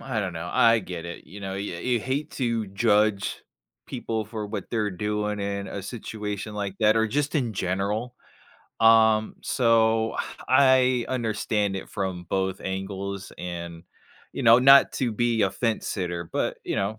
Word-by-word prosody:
I 130 Hz, -5 st, -2 dB
don't 95 Hz, -3 st, -3 dB
know, 80 Hz, +1 st, -5 dB
I 115 Hz, 0 st, +5 dB
get 90 Hz, -4 st, -7 dB
it, 85 Hz, 0 st, -8 dB
you 100 Hz, -, -11 dB
know? 95 Hz, -1 st, -5 dB
You 100 Hz, -1 st, -4 dB
you 120 Hz, +6 st, 0 dB
hate 140 Hz, +6 st, -3 dB
to 115 Hz, -4 st, -1 dB
judge 105 Hz, 0 st, +1 dB, 0.4 s
people 110 Hz, -1 st, -3 dB
for 105 Hz, 0 st, -5 dB
what 105 Hz, +1 st, -6 dB
they're 110 Hz, -3 st, 0 dB
doing 105 Hz, +2 st, -2 dB
in 100 Hz, 0 st, -3 dB
a 100 Hz, -, -6 dB
situation 105 Hz, 0 st, -5 dB
like 100 Hz, -2 st, -3 dB
that, 110 Hz, 0 st, +4 dB
or 110 Hz, 0 st, +3 dB
just 145 Hz, +7 st, -1 dB
in 125 Hz, -7 st, 0 dB
general. 100 Hz, +6 st, -2 dB, 0.7 s
Um, 110 Hz, -1 st, +5 dB
so 115 Hz, -2 st, +2 dB, 0.3 s
I 130 Hz, -2 st, +4 dB
understand 110 Hz, -4 st, -1 dB
it 95 Hz, -, -7 dB
from 95 Hz, -4 st, -4 dB
both 95 Hz, 0 st, -1 dB
angles 95 Hz, 0 st, -5 dB
and, 85 Hz, -1 st, -6 dB, 0.5 s
you -, -, -4 dB
know, 115 Hz, 0 st, +7 dB
not 135 Hz, +2 st, +7 dB
to 120 Hz, -4 st, -1 dB
be 115 Hz, 0 st, +1 dB
a 95 Hz, -, +2 dB
fence-sitter, 90 Hz, -7 st, -2 dB
but, -, -, -1 dB
you -, -, -2 dB
know, 105 Hz, +3 st, -1 dB
105 Hz, 165 wpm, -25 LUFS, 95-115 Hz, 0.7 s, know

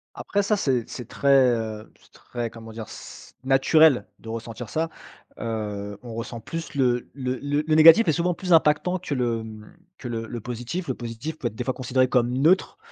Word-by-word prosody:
Après 205 Hz, 0 st, -1 dB
ça 210 Hz, +1 st, +1 dB
c'est 130 Hz, -, 0 dB
c'est 125 Hz, -4 st, -7 dB
très, 140 Hz, -, -1 dB, 0.3 s
heu, 110 Hz, -1 st, -5 dB
c'est -, -, -25 dB
très, 120 Hz, -2 st, -6 dB
comment 115 Hz, -1 st, -11 dB
dire? 110 Hz, -2 st, -7 dB
C -, -, -11 dB
naturel 135 Hz, +2 st, +4 dB
de -, -, -14 dB
ressentir 115 Hz, 0 st, -6 dB
ça, 160 Hz, +1 st, -1 dB, 0.5 s
heu, 105 Hz, -3 st, -4 dB
on 120 Hz, -2 st, -8 dB
ressent 115 Hz, +1 st, -6 dB
plus 165 Hz, +5 st, -6 dB
le 125 Hz, -3 st, +1 dB
le 130 Hz, -2 st, -3 dB
le 145 Hz, +1 st, 0 dB
le 155 Hz, -1 st, +2 dB
négatif 165 Hz, +7 st, +8 dB
est -, -, +6 dB
souvent 175 Hz, +3 st, 0 dB
plus 180 Hz, +1 st, -5 dB
impactant 165 Hz, +3 st, +3 dB
que 150 Hz, -5 st, -4 dB
le, 120 Hz, -3 st, 0 dB
hem, 110 Hz, -1 st, -10 dB, 0.2 s
que 125 Hz, -, -7 dB
le 115 Hz, -1 st, -4 dB
le 120 Hz, 0 st, -6 dB
positif. 125 Hz, -, -5 dB
Le -, -, -1 dB
positif 120 Hz, +7 st, -6 dB
peut 120 Hz, -, -1 dB
être 110 Hz, -, -7 dB
des 125 Hz, -, -3 dB
fois 130 Hz, 0 st, -1 dB
considéré 130 Hz, 0 st, +1 dB
comme 120 Hz, -2 st, +2 dB
neutre, 170 Hz, -, +2 dB
125 Hz, 205 wpm, -24 LUFS, 115-155 Hz, 0.5 s, négatif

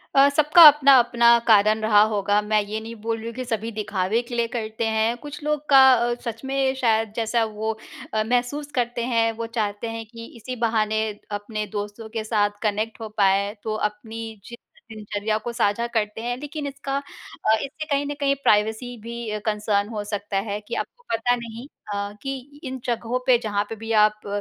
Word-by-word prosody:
अ, 275 Hz, +1 st, +7 dB
सबका 300 Hz, +4 st, +5 dB
अपना-अपना 250 Hz, -5 st, +6 dB
कारण 215 Hz, 0 st, +5 dB
रहा 215 Hz, -1 st, +5 dB
होगा, 205 Hz, 0 st, +1 dB
मैं 210 Hz, 0 st, +1 dB
ये 215 Hz, +2 st, -4 dB
नहीं 225 Hz, +1 st, -8 dB
बोल 225 Hz, +1 st, -2 dB
रही 225 Hz, -, -9 dB
हूँ 230 Hz, -, -5 dB
कि 255 Hz, -, -4 dB
सभी 225 Hz, -1 st, -3 dB
दिखावे 210 Hz, 0 st, -1 dB
के 240 Hz, 0 st, -8 dB
लिए 235 Hz, -1 st, +1 dB
करते 225 Hz, -1 st, -3 dB
हैं। 220 Hz, +2 st, +1 dB
कुछ 290 Hz, +3 st, -9 dB
लोग 300 Hz, 0 st, -1 dB
का 270 Hz, -2 st, +8 dB
अ, 240 Hz, 0 st, +1 dB
सच 230 Hz, 0 st, -5 dB
में 270 Hz, 0 st, +1 dB
शायद 225 Hz, -4 st, +1 dB
जैसा 230 Hz, 0 st, +1 dB
वो 220 Hz, 0 st, -3 dB, 0.4 s
अ, 215 Hz, 0 st, +1 dB
महसूस 250 Hz, +5 st, -1 dB
करते 240 Hz, -1 st, -1 dB
हैं, 230 Hz, -2 st, +2 dB
वो 230 Hz, +1 st, -5 dB
चाहते 220 Hz, -1 st, -3 dB
हैं 225 Hz, 0 st, -6 dB
कि 230 Hz, +1 st, -11 dB
इसी 255 Hz, +3 st, -6 dB
बहाने 220 Hz, -1 st, +1 dB, 0.3 s
अपने 210 Hz, +1 st, -4 dB
दोस्तों 205 Hz, +2 st, -6 dB
के 220 Hz, 0 st, -4 dB
साथ 215 Hz, -2 st, +1 dB
कनेक्ट 215 Hz, +2 st, -1 dB
हो 220 Hz, -, -5 dB
पाएँ, 200 Hz, 0 st, +3 dB
तो 215 Hz, -1 st, -2 dB
अपनी 220 Hz, +1 st, -9 dB
जि 235 Hz, -, -9 dB, 0.4 s
दिनचर्या 215 Hz, 0 st, -2 dB
को 240 Hz, -, -2 dB
साझा 235 Hz, 0 st, +1 dB
करते 215 Hz, -1 st, -1 dB
हैं। 245 Hz, +1 st, -3 dB
लेकिन 295 Hz, +1 st, -5 dB
इसका 275 Hz, 0 st, -5 dB
अ, 280 Hz, -5 st, -2 dB
इससे 310 Hz, +3 st, -6 dB
कहीं 285 Hz, -2 st, 0 dB
न 290 Hz, -, -3 dB
कहीं 275 Hz, -1 st, +2 dB
प्राइवेसी 220 Hz, +4 st, +1 dB
भी 235 Hz, 0 st, -6 dB
अ, 210 Hz, 0 st, -3 dB
कंसर्न 210 Hz, -1 st, 0 dB
हो 215 Hz, -3 st, -4 dB
सकता 205 Hz, -1 st, -3 dB
है 205 Hz, +1 st, -2 dB
कि 235 Hz, -, -4 dB
आपको 485 Hz, -, -6 dB
पता 235 Hz, +2 st, +2 dB
नहीं 235 Hz, +1 st, -8 dB, 0.3 s
अ, 200 Hz, 0 st, -3 dB
कि 270 Hz, +1 st, -7 dB
इन 260 Hz, -2 st, -5 dB
जगहों 240 Hz, 0 st, -1 dB
पे 255 Hz, -2 st, +5 dB
जहाँ 205 Hz, -2 st, 0 dB
पे 225 Hz, -, -5 dB
भी 225 Hz, +1 st, -7 dB
आप 215 Hz, 0 st, -3 dB
225 Hz, 195 wpm, -23 LUFS, 215-245 Hz, 0.4 s, का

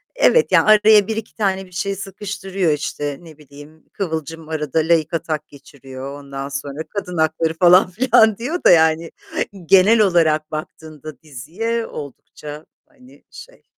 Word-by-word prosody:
evet, 485 Hz, -1 st, +3 dB
yani -, -, +4 dB
araya 210 Hz, -1 st, +6 dB
1-2 220 Hz, 0 st, -5 dB
tane 195 Hz, -3 st, -1 dB
bir 180 Hz, -, -20 dB
şey 195 Hz, +2 st, -3 dB
sıkıştırıyor 195 Hz, -2 st, -3 dB
işte, 145 Hz, -1 st, -4 dB
ne 160 Hz, -3 st, -15 dB
bileyim, 145 Hz, +2 st, -16 dB
kıvılcım 160 Hz, -3 st, -5 dB
arada 155 Hz, -1 st, -2 dB
laik 160 Hz, 0 st, +1 dB
atak 155 Hz, -2 st, -3 dB
geçiriyor, 140 Hz, -1 st, -11 dB
ondan 140 Hz, 0 st, -7 dB
sonra 140 Hz, +2 st, -5 dB
kadın 185 Hz, -4 st, -5 dB
hakları 160 Hz, +1 st, 0 dB
falan 180 Hz, +2 st, +5 dB
filan 220 Hz, 0 st, +3 dB
diyor 295 Hz, +10 st, -4 dB
da, -, -, +6 dB
yani, 160 Hz, 0 st, +3 dB, 0.5 s
genel 195 Hz, +6 st, +5 dB
olarak 160 Hz, -6 st, +2 dB
baktığında 155 Hz, 0 st, -9 dB
diziye 180 Hz, -, -4 dB
oldukça, 150 Hz, +2 st, -10 dB, 0.2 s
hani, 265 Hz, -3 st, -21 dB
şey, -, -, -14 dB
165 Hz, 140 wpm, -19 LUFS, 150-200 Hz, 0.5 s, araya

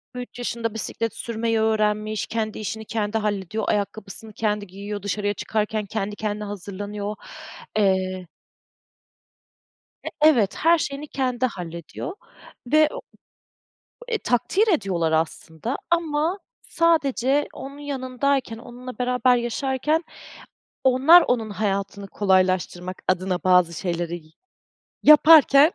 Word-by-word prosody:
3 245 Hz, 0 st, -8 dB
yaşında 230 Hz, -2 st, -3 dB
bisiklet 225 Hz, 0 st, -3 dB
sürmeyi 225 Hz, -1 st, -1 dB
öğrenmiş, 215 Hz, -1 st, 0 dB
kendi 220 Hz, -1 st, -3 dB
işini 220 Hz, +1 st, -5 dB
kendi 215 Hz, 0 st, -2 dB
hallediyor, 210 Hz, 0 st, -2 dB
ayakkabısını 210 Hz, +1 st, -3 dB
kendi 210 Hz, -1 st, -1 dB
giyiyor, 200 Hz, +2 st, -7 dB
dışarıya 205 Hz, 0 st, -1 dB
çıkarken 215 Hz, +1 st, -2 dB
kendi 205 Hz, 0 st, -3 dB
kendine 210 Hz, 0 st, -3 dB
hazırlanıyor. 205 Hz, +1 st, -5 dB, 0.6 s
Eee 185 Hz, -2 st, +1 dB, 1.8 s
E, -, -, -3 dB
evet 245 Hz, -11 st, +4 dB
her 335 Hz, +1 st, +4 dB
şeyini 290 Hz, 0 st, -4 dB
kendi 255 Hz, -2 st, 0 dB
hallediyor 170 Hz, -, -7 dB, 0.5 s
ve 305 Hz, +4 st, +4 dB
o -, -, -5 dB, 1.1 s
e, 470 Hz, -2 st, 0 dB
takdir 385 Hz, -, +1 dB
ediyorlar 185 Hz, -, +1 dB
aslında, 160 Hz, -, -2 dB
ama 330 Hz, +2 st, +1 dB, 0.2 s
sadece 290 Hz, -4 st, +2 dB
onun 275 Hz, +1 st, -9 dB
yanındayken, 270 Hz, -3 st, -2 dB
onunla 245 Hz, +1 st, -10 dB
beraber 250 Hz, 0 st, +3 dB
yaşarken, 265 Hz, +6 st, -1 dB, 0.8 s
onlar 265 Hz, +7 st, +7 dB
onun 225 Hz, -3 st, 0 dB
hayatını 200 Hz, -1 st, -2 dB
kolaylaştırmak 185 Hz, -2 st, 0 dB
adına 185 Hz, 0 st, 0 dB
bazı 180 Hz, -2 st, +4 dB
şeyleri 170 Hz, -1 st, -3 dB
y 155 Hz, -, -22 dB, 0.7 s
yaparken 305 Hz, 0 st, +7 dB
220 Hz, 105 wpm, -23 LUFS, 200-265 Hz, 1.8 s, onlar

